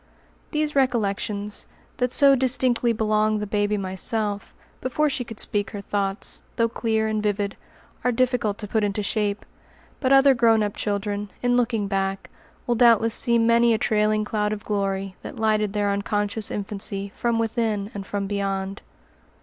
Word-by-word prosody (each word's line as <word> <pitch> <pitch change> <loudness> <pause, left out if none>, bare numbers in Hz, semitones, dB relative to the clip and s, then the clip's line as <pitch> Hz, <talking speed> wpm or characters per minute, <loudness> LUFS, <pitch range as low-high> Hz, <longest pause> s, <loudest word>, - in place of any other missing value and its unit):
These 300 -1 -1
recollections, 210 -5 -1 0.3
that 250 -1 0
so 280 +1 +6
distinctly 250 -2 +2
belong 215 -1 +1
the 210 - -3
baby 210 0 0
Myself, 200 +2 -1 0.3
before 290 +4 0
she 260 -2 -2
could 225 -3 -6
speak 205 -1 -1
her 205 - -6
thoughts, 200 0 -2
though 230 - +2
clear 220 -1 0
and 215 -1 -1
vivid, 205 -1 -1 0.5
are 250 - +2
difficult 240 -4 0
to 210 - -6
put 220 +1 0
into 205 0 -1
shape. 205 -1 -1 0.5
But 260 -1 0
other 275 0 +7
grown 230 -3 +4
up 205 -1 -3
children, 205 0 -2
in 245 0 +3
looking 230 -4 +1
back, 195 0 -2 0.3
will 240 - +1
doubtless 230 -2 +4
see 235 0 +4
many 230 0 +4
a - - 0
trailing 215 -1 +1
cloud 210 0 -1
of 210 +1 -7
glory, 195 -2 -2
that - - -8
lighted 215 -2 +1
their 205 -1 +1
unconscious 205 +1 -2
infancy 200 -1 -3
from 235 -1 0
within 225 -2 -1
and 200 - -5
from 200 +1 -3
beyond. 195 -1 -3
215 Hz, 160 wpm, -24 LUFS, 200-235 Hz, 0.5 s, other